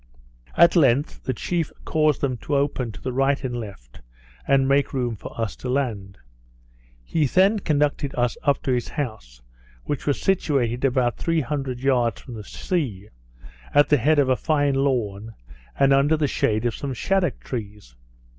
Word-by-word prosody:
At 170 +1 +6
length 140 -3 +2
the 130 - 0
chief 170 +5 -2
caused 155 -3 +1
them 130 -3 0
to 145 - -3
open 140 -4 0
to 110 - -11
the 130 - -4
right 135 +2 +1
and 125 -2 -3
left, 100 - -9 0.5
and 135 -1 +3
make 140 +1 +2
room 125 -4 -1
for 105 - -10
us 115 -3 -2
to 125 - -6
land. 110 -8 -2 0.9
He 150 - 0
then 195 - +3
conducted 145 -4 0
us 120 -1 0
up 140 - +1
to 130 - 0
his 125 -2 0
house, - - -6 0.4
which 145 - -4
was 145 - +1
situated 135 -10 0
about 125 -4 +1
three 165 -1 0
hundred 135 -2 -3
yards 125 -5 +1
from 125 - -11
the 110 -2 -7
sea, 110 - -3 0.7
at 145 0 +5
the 150 - +5
head 150 +5 +2
of 140 -2 +3
a 130 - +4
fine 145 -1 +1
lawn, 115 -6 -1 0.4
and 135 0 +4
under 145 +3 +3
the 150 - +1
shade 110 -3 0
of 120 - +1
some 135 -2 -5
shaddock 190 0 0
trees. 105 - -7
135 Hz, 175 wpm, -23 LUFS, 115-145 Hz, 0.9 s, At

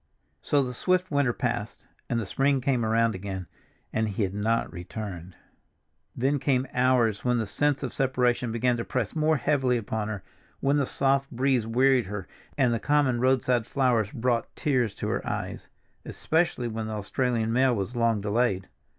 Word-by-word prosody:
So 145 -1 +2
the 125 -1 -4
swift 185 +7 0
winter 140 -4 +2
passed 120 -2 -3 0.2
and 120 -3 +1
the 115 - -3
spring 135 +6 +1
came 125 -2 0
around 115 +1 +2
again, 95 -1 -5 0.5
and 110 -1 0
he 105 +1 -1
had 95 -1 -2
not 110 +3 0
returned. 90 -1 -7 0.8
Then 135 +3 +1
came 130 -1 +1
hours 125 -4 +2
when 125 -1 +2
the 115 - 0
sense 145 +7 0
of 130 - -4
separation 125 -2 +1
began 120 +1 +1
to 115 - -2
press 125 -1 -2
more 155 0 +2
heavily 135 -3 +1
upon 110 -1 -3
her, 105 -3 -5 0.4
when 140 +1 +2
the 140 -3 +1
soft 135 0 +1
breeze 130 -2 +1
wearied 125 -1 +3
her 100 -2 -5 0.3
and 125 -4 +3
the 115 - 0
common 145 -3 +2
roadside 125 -2 +2
flowers 120 -6 +1
brought 120 0 0
tears 125 -8 0
to - - -4
her - - -1
eyes—especially 160 -7 -3
when 110 -1 -4
the 110 - -4
Australian 115 +2 -1
mail 130 0 +3
was 100 +4 -3
long 115 -3 +2
delayed. 105 -2 0
120 Hz, 170 wpm, -27 LUFS, 110-135 Hz, 0.8 s, wearied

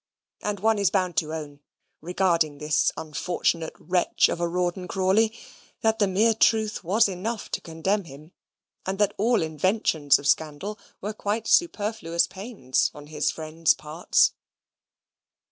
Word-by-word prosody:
And 205 -1 -3
one 220 +1 +2
is 200 -3 +3
bound 185 -2 0
to 155 -2 0
own, 150 -3 -6 0.4
regarding 170 -3 +1
this 150 +1 +1
unfortunate 160 +1 -2
wretch 180 -1 +2
of - - -3
a 170 - 0
Rawdon 180 +1 -2
Crawley, 195 +4 +2 0.5
that 225 0 +1
the 205 - +3
mere 215 +4 +3
truth 220 -2 +2
was 205 +6 +3
enough 200 +4 -4
to - - -2
condemn 185 +5 -2
him, 150 +2 -13 0.5
and 190 +1 -3
that 205 0 +2
all 230 -2 +2
inventions 160 -2 +2
of 140 - -10
scandal 160 +8 0 0.2
were 210 +2 -4
quite 210 +1 -2
superfluous 205 - +1
pains 190 - -2
on 145 0 -10
his 150 -1 +1
friends' 160 0 +1
parts. 155 +3 +1
180 Hz, 145 wpm, -25 LUFS, 160-210 Hz, 0.5 s, is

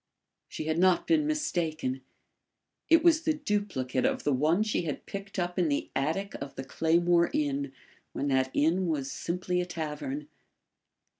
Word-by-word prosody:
She - - -5
had 160 +1 0
not 185 -1 +4
been 315 -2 +3
mistaken; 160 - -1 0.9
it 330 -1 +6
was 330 -2 +5
the 315 -1 +1
duplicate 200 - -1
of - - 0
the 145 - +2
one 155 +9 +3
she 215 - 0
had 155 -5 -4
picked 200 0 -7
up 180 0 -1
in 170 -3 +2
the 140 - -1
attic 165 +9 -1
of 140 0 -6
the 135 - -5
Claymore 170 +4 +2
Inn 140 -2 -1 0.4
when 140 - -2
that 130 -1 +2
inn 170 +7 +2
was 140 -4 -1
simply 180 +1 -2
a - - -2
tavern. 150 -4 -4
170 Hz, 160 wpm, -29 LUFS, 145-195 Hz, 0.9 s, it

